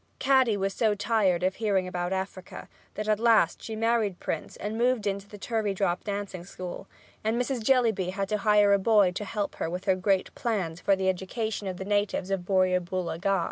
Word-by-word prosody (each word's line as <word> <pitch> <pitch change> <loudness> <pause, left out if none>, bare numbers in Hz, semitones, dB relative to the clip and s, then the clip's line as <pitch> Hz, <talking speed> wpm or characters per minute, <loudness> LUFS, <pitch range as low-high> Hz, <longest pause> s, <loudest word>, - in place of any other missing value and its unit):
Caddy 260 -5 +3
was 195 0 -1
so 215 -1 +1
tired 205 -4 +1
of 185 +1 0
hearing 200 -4 +1
about 175 0 -3
Africa 190 -1 -5 0.3
that 210 0 -4
at 215 -1 +2
last 225 -7 +3
she 220 - -6
married 225 -4 +1
Prince 160 - -4
and 210 +1 -4
moved 240 -2 +1
into 200 0 -3
the 205 - -10
Turveydrop 200 -5 -1
dancing 200 -3 -4
school, 180 +1 -8 0.4
and 220 +2 0
Mrs. 250 -1 -1
Jellyby 225 -7 +2
had 195 +1 -2
to 210 - 0
hire 210 0 +4
a 200 - +4
boy 205 -2 +4
to 185 - -4
help 205 0 -3
her - - -2
with 180 +2 -5
her 190 - +3
great 190 0 0
plans 185 -8 -2
for 195 - +3
the 190 0 -1
education 200 +3 -2
of 185 -1 -4
the 190 - -6
natives 205 -2 0
of 185 -2 -2
Borrioboola 185 -2 0
Gha. 195 0 +2
200 Hz, 200 wpm, -27 LUFS, 185-220 Hz, 0.4 s, hire